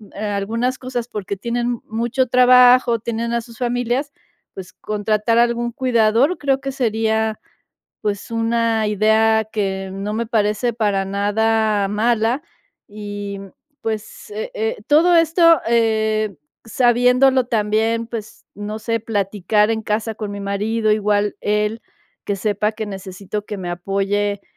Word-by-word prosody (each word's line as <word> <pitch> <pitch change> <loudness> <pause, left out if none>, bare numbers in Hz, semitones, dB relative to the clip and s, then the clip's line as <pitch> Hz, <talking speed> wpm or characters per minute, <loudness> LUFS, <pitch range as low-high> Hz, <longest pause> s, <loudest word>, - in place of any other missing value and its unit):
algunas 215 +5 -2
cosas, 245 -2 -4
porque, 200 -1 -4
tienen 240 +3 -2
mucho 235 +4 -1
trabajo, 250 -1 +6
tienen 235 +1 -3
a 235 - 0
sus 230 -1 -14
familias, 245 +3 -1 0.4
pues, 185 -1 -9
contratar 215 +2 -1
algún 235 0 +1
cuidador, 245 +5 +2
creo 275 -1 0
que 275 - -3
sería, 220 -3 0 0.6
pues, 205 -1 -3
una 230 -1 +1
idea 220 +1 +3
que 195 -3 -2
no 195 +2 -4
me 230 +1 -2
parece 215 +1 0
para 205 -4 0
nada 205 +1 +1
mala. 225 +5 +1 0.4
Y, 205 -1 -6
mm, 195 -1 -10 0.3
pues, 220 - -5
eh 440 +4 -5
eh, 460 0 -2
todo 330 +4 +5
esto, 330 -1 +5
eh, 220 -4 +1 0.3
sabiéndolo 250 +2 +3
también, 225 +1 0
pues, 225 -3 -8
no 210 +1 -5
sé, 230 +1 -1
platicar 210 0 0
en 220 - -2
casa 220 +1 -2
con 210 -1 -5
mi 200 - -6
marido, 215 +3 0
igual 210 -1 +1
él, 210 +2 0 0.4
que 200 - -1
sepa 210 +2 -1
que 220 - -5
necesito 195 +1 -6
que 210 - -6
me 180 -2 -5
apoye, 200 +3 -1
220 Hz, 135 wpm, -20 LUFS, 205-240 Hz, 0.6 s, trabajo